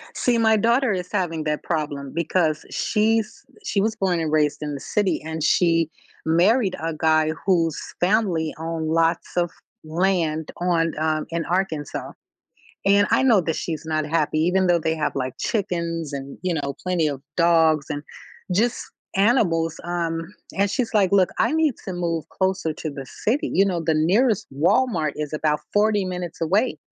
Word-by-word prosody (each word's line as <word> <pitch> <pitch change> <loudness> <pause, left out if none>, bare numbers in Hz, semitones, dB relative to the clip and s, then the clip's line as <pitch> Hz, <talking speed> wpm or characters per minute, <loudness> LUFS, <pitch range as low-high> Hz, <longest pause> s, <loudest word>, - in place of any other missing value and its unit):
See, 240 -2 +2
my 220 -1 +4
daughter 235 +3 +2
is 180 -1 -4
having 175 -6 -1
that 150 0 -1
problem 145 -4 -3
because 165 -1 0
she's 220 0 0 0.2
she 200 - +1
was 220 +2 0
born 190 -5 0
and 160 -2 -1
raised 150 -1 +1
in 150 -1 -3
the - - -6
city, 190 0 0
and 160 -1 -4
she 165 -1 +3 0.4
married 185 +6 +3
a 165 +1 -2
guy 155 0 +2
whose 170 -5 +2 0.2
family 180 -5 +1
own 165 -1 -3
lots 165 +1 +1
of 175 -1 +2 0.3
land 160 -2 0
on, 165 -2 +1
um, 155 -1 0
in 170 0 -1
Arkansas, 170 -5 -2 0.7
and 200 +1 +5
I - - +4
know 230 -7 +5
that 165 -2 -2
she's 160 -2 -4
not 155 -1 0
happy 155 -1 0
even 185 +3 +2
though 175 -1 +4
they 160 0 -1
have, 155 -1 -1
like, 130 -1 -2
chickens, 170 -6 -2
and, 140 0 -6
you 180 -2 0
know, 140 -2 -3
plenty 180 -4 +1
of 140 -2 -5
dogs, 165 -3 +4
and 145 0 -3 0.5
just 230 +6 +1 0.3
animals, 185 -7 +2
um, 170 -1 -2 0.4
and 200 +1 +2
she's 230 +2 -1
like, 200 -4 +4
"Look, 190 -2 +4
I 235 - +2
need 315 -4 +2
to 190 - -3
move 170 -3 -2
closer 190 -4 -1
to 155 - -5
the 140 -2 -8 0.2
city, 245 +7 +1
you 195 - +5
know, 180 -4 -1
the 160 -1 +1
nearest 205 +8 +2
Walmart 160 - +2
is 150 -1 -4
about 150 0 0
40 205 -1 +3
minutes 180 -2 -5
away." 195 +9 +1
170 Hz, 170 wpm, -23 LUFS, 155-195 Hz, 0.7 s, and